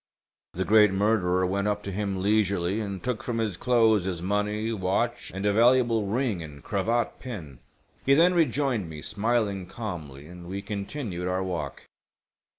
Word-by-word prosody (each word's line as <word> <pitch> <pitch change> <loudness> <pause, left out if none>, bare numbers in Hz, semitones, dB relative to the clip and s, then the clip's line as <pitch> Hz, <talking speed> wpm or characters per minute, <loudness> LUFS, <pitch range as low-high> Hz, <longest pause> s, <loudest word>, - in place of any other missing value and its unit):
The 95 +1 -2
great 105 -1 +6
murderer 95 -2 +2
went 100 +2 0
up 105 0 -1
to 100 - -4
him 95 -1 -2
leisurely 100 -2 +1
and 100 -3 -5
took 125 -3 -2
from 120 -2 -3
his 110 -5 -1
clothes 110 -2 +3
his 90 -3 -2
money, 105 +4 -1
watch, 110 +5 -1
and 95 +2 -4
a 105 - +3
valuable 115 -1 +4
ring 110 -3 0
and 75 -3 -10
cravat 115 +4 -1
pin. 80 - -8 0.4
He 135 - +5
then 175 +4 +5
rejoined 135 - +1
me 75 -2 -8
smiling 105 -3 0
calmly, 80 - -7
and 85 +1 -11
we 100 +2 -5
continued 100 -2 -4
our 90 +1 0
walk. 90 -3 -4
100 Hz, 160 wpm, -27 LUFS, 95-115 Hz, 0.4 s, great